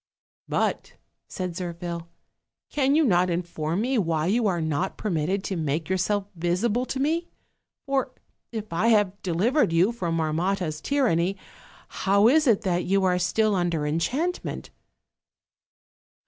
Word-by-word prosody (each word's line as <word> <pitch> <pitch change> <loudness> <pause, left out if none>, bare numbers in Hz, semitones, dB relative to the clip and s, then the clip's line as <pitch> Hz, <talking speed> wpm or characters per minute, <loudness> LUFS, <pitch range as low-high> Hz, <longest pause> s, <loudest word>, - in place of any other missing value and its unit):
"But," - - -1 0.3
said 185 -1 -4
Zirphil, 170 -1 -5 0.6
"can 280 -1 +2
you 320 - +4
not 180 -5 +3
inform 170 0 -2
me 255 +1 +1
why 165 -4 0
you 220 +5 +2
are 180 -3 0
not 160 +3 -1
permitted 190 0 -1
to 195 - -3
make 155 0 -2
yourself 195 +2 0
visible 195 +8 0
to 265 - -3
me? 325 +5 0 0.6
For, 275 -2 0 0.4
if 215 -5 -6
I 180 +7 +1
have 205 -3 +2
delivered 195 - +1
you 175 +6 +3
from 175 -8 -2
Marmotta's 160 0 -1
tyranny, 195 - +1 0.7
hoAV 200 +5 +5
is 310 -2 +3
it 225 -3 +4
that 180 -4 0
you 195 +1 +2
are 180 -1 +2
still 215 +4 +2
under 175 -5 0
enchantment?" 255 - -2
190 Hz, 135 wpm, -25 LUFS, 170-225 Hz, 0.7 s, hoAV